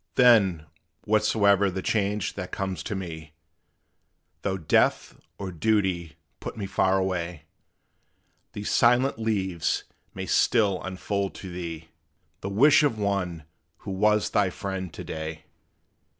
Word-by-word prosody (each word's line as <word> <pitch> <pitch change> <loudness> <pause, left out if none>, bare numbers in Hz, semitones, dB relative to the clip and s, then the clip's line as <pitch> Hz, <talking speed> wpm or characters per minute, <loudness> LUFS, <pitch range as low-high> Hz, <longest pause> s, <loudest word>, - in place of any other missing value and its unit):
Then, 100 -10 +5 0.4
whatsoe'er 100 -2 +3
the 95 0 -4
change 105 -1 0
that - - -6
comes 95 -1 -3
to 105 - -4
me 80 -5 -7 1.1
Though 95 -1 -1
death 80 -4 +2 0.2
or 95 -2 -5
duty 90 -3 0 0.2
put - - -7
me 105 - -3
far 95 0 +2
away, 90 -3 -2 1.1
These 105 0 -4
silent 125 +1 +3
leaves 95 -6 -1 0.3
may - - -4
still 105 -6 +2
unfold 100 +1 -3
to 95 - -8
thee 85 -2 -6 0.5
The 100 - -5
wish 135 +10 +5
of 145 -7 +1
one 95 -6 -1 0.4
who 100 - -4
was 105 +2 +2
thy 100 -2 +2
friend 95 -1 -5
to - - -8
day. 80 0 -6
95 Hz, 125 wpm, -26 LUFS, 90-105 Hz, 1.1 s, Then